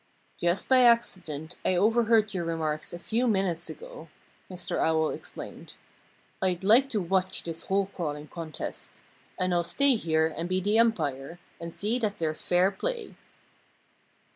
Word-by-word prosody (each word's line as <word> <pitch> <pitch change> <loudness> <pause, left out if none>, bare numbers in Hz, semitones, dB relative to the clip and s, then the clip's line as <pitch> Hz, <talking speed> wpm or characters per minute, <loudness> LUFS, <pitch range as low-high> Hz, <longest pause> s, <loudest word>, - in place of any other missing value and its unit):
"Just 175 +2 0
by 260 -1 +6
accident 180 - +1
I 185 - +2
overheard 220 +2 +3
your 180 -2 -2
remarks 160 -2 -2
a 175 - -6
few 230 +8 0
minutes 190 -6 0
ago," - - -10 0.4
Mr. 180 -1 -3
Owl 160 -1 +2
explained. - - -9 0.7
"I'd 185 -1 0
like 235 +7 +5
to 220 - 0
watch 185 +1 0
this 165 -1 -6
hole 195 +1 +1
crawling 150 -3 -4
contest. 165 -3 -7 0.4
And 185 -1 +1
I'll 175 0 +2
stay 265 +12 +4
here 160 -6 +1
and 170 +2 -3
be 185 0 +1
the 205 +4 +2
umpire 160 - 0 0.2
and 170 0 -6
see 215 +8 -1
that 210 -3 -1
there's 155 -2 -2
fair 180 +2 +3
play." 475 - -4
185 Hz, 150 wpm, -28 LUFS, 165-220 Hz, 0.7 s, by